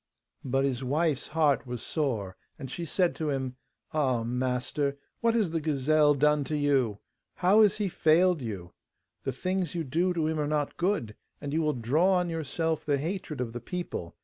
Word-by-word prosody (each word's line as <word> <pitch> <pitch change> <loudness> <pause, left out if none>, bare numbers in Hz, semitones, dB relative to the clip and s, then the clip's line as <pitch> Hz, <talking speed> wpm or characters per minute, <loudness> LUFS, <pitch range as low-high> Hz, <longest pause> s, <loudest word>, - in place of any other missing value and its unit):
But 135 +1 +1
his 135 -2 -1
wife's 145 +2 0
heart 150 -4 +2
was 125 -1 -4
sore, 115 - -2 0.2
and 135 -1 -7
she 170 - -4
said 180 +2 +1
to 155 -2 -1
him: 130 -2 -2 0.4
'Ah, 130 -6 +1
master, 125 +4 -1 0.2
what 230 0 +2
has 210 -8 +2
the 165 -1 -1
gazelle 150 0 +3
done 150 +1 +3
to 150 +3 -2
you? 135 -7 +2 0.4
How 195 +4 +5
has 210 -3 +4
he 210 -2 0
failed 175 -1 +3
you? 95 -7 -6 0.5
The 135 - 0
things 180 +6 -2
you 170 - -1
do 165 +6 +1
to 160 -2 +1
him 160 0 -1
are 150 - 0
not 150 -1 -1
good, 170 - -1 0.2
and 145 -1 -5
you 160 - +2
will 155 -1 +1
draw 145 +11 +2
on 180 -2 +1
yourself 160 0 -1
the 145 -2 +1
hatred 160 -1 -4
of 120 -2 -3
the 120 - -5
people. 170 - -5
150 Hz, 190 wpm, -28 LUFS, 130-165 Hz, 0.5 s, How